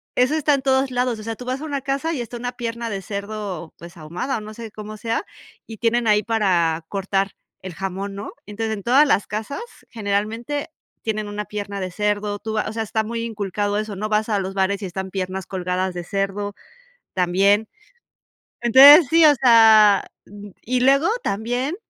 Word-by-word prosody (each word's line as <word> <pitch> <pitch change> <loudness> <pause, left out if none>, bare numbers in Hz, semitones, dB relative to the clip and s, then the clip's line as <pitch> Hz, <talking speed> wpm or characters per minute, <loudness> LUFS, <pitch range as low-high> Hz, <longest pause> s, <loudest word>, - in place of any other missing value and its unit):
eso 255 +5 +3
está 300 -1 +2
en 275 - -3
todos 265 0 +2
lados, 245 -2 -1
o - - -8
sea, 225 0 -4
tú 250 - -10
vas 255 +2 -2
a - - -5
una 285 -3 -3
casa 275 +5 -2
y 265 - -3
está 240 +1 -7
una 245 +1 -4
pierna 235 -1 -4
de 195 -2 -4
cerdo, 200 -4 -6
pues, 170 +2 -12
ahumada 175 - -4
o - - -6
no 215 +1 -9
sé 225 -1 -9
cómo 215 0 -8
sea, 230 - -2 0.4
y 225 - -9
tienen 235 +1 +1
ahí 210 0 +4
para 175 -8 +1
cortar 195 0 -1 0.3
el 185 -1 -7
jamón, 195 +2 -5
¿no? 200 +2 -6
Entonces, 220 +2 -3
en 200 - -9
todas 270 +5 +5
las 205 - +2
casas, 220 - -4 0.3
generalmente, 225 +8 -2 0.3
tienen 215 -2 -2
una 210 0 -4
pierna 200 -1 -5
de 185 -1 -4
cerdo. 205 +1 -1
Tú 220 +1 -5
vas 215 -1 -1
o - - -7
sea, 225 0 -2
está 220 +1 -1
muy 230 +1 -4
inculcado 205 -2 -2
eso, 215 -2 -4
¿no? 215 +3 -4
Vas 215 +1 +1
a 210 -2 +1
los 190 0 -4
bares 195 +1 0
y - - -4
están 190 +1 -5
piernas 190 0 -4
colgadas 185 0 -2
de 175 - -4
cerdo 195 +2 -3 0.6
también. 195 +4 +2 0.9
Entonces, 275 +6 +9
sí, 330 0 +6
o 300 - +8
sea, 220 -5 +6 0.2
mm, 205 +1 -11
y 250 +1 0
luego 275 +5 +4 0.2
también 245 - -2
215 Hz, 195 wpm, -22 LUFS, 195-240 Hz, 0.9 s, Entonces